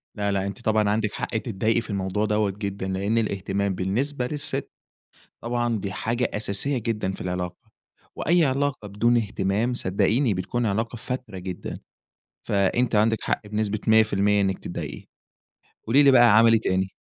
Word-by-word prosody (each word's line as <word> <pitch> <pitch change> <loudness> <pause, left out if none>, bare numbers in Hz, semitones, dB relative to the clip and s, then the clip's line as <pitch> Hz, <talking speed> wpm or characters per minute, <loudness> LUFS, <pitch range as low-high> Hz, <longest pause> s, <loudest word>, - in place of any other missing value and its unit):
لأ 100 -2 -1
لأ 100 -1 0
أنتِ 100 +4 -7
طبعًا 110 -2 +2
عندِك 105 0 0
حق 110 - -3
تضايقي 110 +1 0
في 115 - -11
الموضوع 100 +1 -1
دوّة 105 -1 +1
جدًا، 100 -1 -5
لأن 100 +4 -1
الاهتمام 100 -2 -1
بالنسبة 125 +8 -1
للست، 145 +1 -4 0.7
طبعًا 120 -1 -1
دي 100 0 -4
حاجة 115 +6 -1
أساسية 110 +6 0
جدًا 105 -4 -2
في - - -8
العلاقة، 90 +5 -5 0.4
وأي 170 -1 +3
علاقة 135 -4 -1
بدون 120 +4 +2
اهتمام 105 +2 0
صدّقيني 115 +4 +1
بتكون 100 +6 -2
علاقة 115 +3 -1
فاتِرة 125 -3 -5
جدًا، 90 -1 -6 0.6
فأنتِ 105 +4 +1
عندِك 110 +1 +2
حق 105 - -2
بنسبة 105 0 -1
100% 105 -2 +4
إنّك 95 -1 0
تضايقي، 85 - -6 0.8
قولي 135 +6 +5
لي 140 - +7
بقى 120 -5 +6
عمل 115 0 +6
إيه 115 - +4
تاني؟ 95 -2 -1
105 Hz, 155 wpm, -24 LUFS, 100-120 Hz, 0.8 s, لي